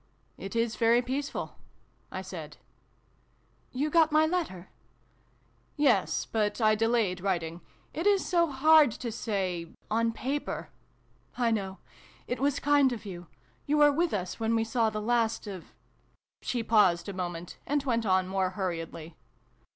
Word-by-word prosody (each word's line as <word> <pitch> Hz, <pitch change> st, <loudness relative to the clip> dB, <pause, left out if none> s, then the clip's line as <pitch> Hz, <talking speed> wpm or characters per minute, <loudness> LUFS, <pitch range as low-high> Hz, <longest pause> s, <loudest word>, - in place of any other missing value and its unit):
" -, -, -39 dB
It 195 Hz, -, -6 dB
is 230 Hz, -1 st, 0 dB
very 235 Hz, +1 st, +4 dB
peaceful," 275 Hz, +3 st, -4 dB, 0.5 s
I -, -, -5 dB
said. -, -, -8 dB, 0.6 s
" -, -, -39 dB
You 305 Hz, +1 st, 0 dB
got 325 Hz, -1 st, +4 dB
my 310 Hz, +1 st, +5 dB
letter? 315 Hz, -, -3 dB, 0.4 s
" -, -, -38 dB
" -, -, -38 dB
Yes, 290 Hz, -4 st, +2 dB
but 210 Hz, -1 st, -1 dB
I 215 Hz, -2 st, +4 dB
delayed 220 Hz, -4 st, +1 dB
writing. 175 Hz, -3 st, -2 dB, 0.3 s
It 330 Hz, +6 st, -1 dB
is 400 Hz, -2 st, +3 dB
so 340 Hz, -2 st, +2 dB
hard 300 Hz, +1 st, +6 dB
to 235 Hz, 0 st, -5 dB
say 190 Hz, -6 st, -2 dB, 0.2 s
on 230 Hz, +1 st, +2 dB
paper 270 Hz, +5 st, -4 dB, 0.2 s
" -, -, -37 dB
" -, -, -31 dB
I 230 Hz, -, +3 dB
know. 195 Hz, -3 st, -2 dB, 0.5 s
It 245 Hz, -, -3 dB
was 280 Hz, +1 st, +1 dB
kind 285 Hz, -2 st, +4 dB
of 230 Hz, -2 st, -6 dB
you. 175 Hz, -3 st, -8 dB, 0.4 s
You 300 Hz, +1 st, +2 dB
were 295 Hz, 0 st, +6 dB
with 335 Hz, +4 st, +1 dB
us 185 Hz, -1 st, -3 dB
when 225 Hz, 0 st, +1 dB
we 225 Hz, -, +2 dB
saw 225 Hz, 0 st, +1 dB
the 215 Hz, 0 st, -4 dB
last 230 Hz, -1 st, +1 dB
of 195 Hz, -4 st, -7 dB, 0.8 s
She 240 Hz, -2 st, -2 dB
paused 205 Hz, -6 st, +3 dB
a 200 Hz, -, -4 dB
moment, 175 Hz, -2 st, -5 dB
and 290 Hz, 0 st, 0 dB
went 235 Hz, -4 st, 0 dB
on 185 Hz, -2 st, +2 dB
more 190 Hz, -1 st, 0 dB
hurriedly. 165 Hz, -3 st, -4 dB
225 Hz, 165 wpm, -29 LUFS, 190-280 Hz, 0.8 s, hard